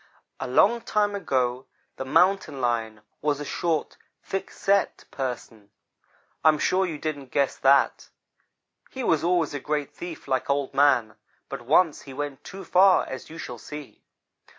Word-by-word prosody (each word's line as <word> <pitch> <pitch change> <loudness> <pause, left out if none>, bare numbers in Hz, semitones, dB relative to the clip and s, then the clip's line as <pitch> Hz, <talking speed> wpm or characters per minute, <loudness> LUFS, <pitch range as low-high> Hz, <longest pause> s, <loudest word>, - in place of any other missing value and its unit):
"A - - -3
long 210 - +4
time 210 -2 0
ago 130 -9 -1 0.3
the 130 - -4
Mountain 175 0 +2
lion 115 -3 -1 0.2
was 145 -1 0
a 145 - -5
short, 165 -1 -2 0.3
thick 195 - -4
set 200 0 0
person. 120 -5 -5 0.7
I 160 - +7
am 155 - +3
sure 185 +5 +1
you 160 -3 -4
didn't 145 -3 -4
guess 140 +1 +1
that. 135 +1 +3 0.8
He 265 - -6
was 165 -8 +2
always 170 -3 +1
a 145 - -3
great 150 0 -2
thief 175 -4 -8
like 130 0 -1
Old 140 -1 0
man, 135 -6 +3 0.3
but - - -5
once 155 +6 +3
he 135 -2 -11
went 145 -1 -5
too 195 +1 -9
far, 185 +2 +5
as 130 -1 -7
you 160 - -10
shall 120 -7 -7
see. 150 +2 -10
145 Hz, 160 wpm, -25 LUFS, 130-175 Hz, 0.8 s, I